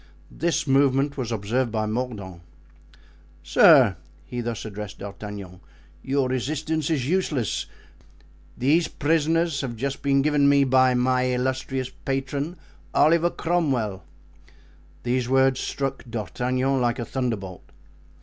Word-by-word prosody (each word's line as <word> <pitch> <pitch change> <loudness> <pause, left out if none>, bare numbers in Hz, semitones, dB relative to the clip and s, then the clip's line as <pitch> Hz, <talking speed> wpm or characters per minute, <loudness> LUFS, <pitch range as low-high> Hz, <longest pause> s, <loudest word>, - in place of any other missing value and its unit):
This 170 -2 -1
movement 135 0 +2
was 125 -4 -4
observed 115 +3 -1
by 110 -1 -1
Mordaunt. 105 -6 -4 1.0
"Sir!" 115 - +6 0.3
he 120 +8 -4
thus 115 -2 -4
addressed 105 -1 -7
D'Artagnan, 100 -3 -8 0.4
"your 135 +3 0
resistance 150 +4 -2
is 140 -6 0
useless; 150 - -1 0.9
these 155 +7 +3
prisoners 165 0 +1
have 125 -4 -4
just 135 +4 -3
been 140 -1 +2
given 145 -1 +3
me 140 0 +5
by 130 -1 +4
my 125 +1 +2
illustrious 130 +1 -2
patron, 140 +5 -2 0.4
Oliver 170 +2 +4
Cromwell." 135 - -1 1.0
These 125 0 0
words 135 0 +3
struck 135 -1 -3
D'Artagnan 125 +5 -1
like 120 0 +1
a 120 - -3
thunderbolt. 110 -9 -4
130 Hz, 115 wpm, -24 LUFS, 115-140 Hz, 1.0 s, Sir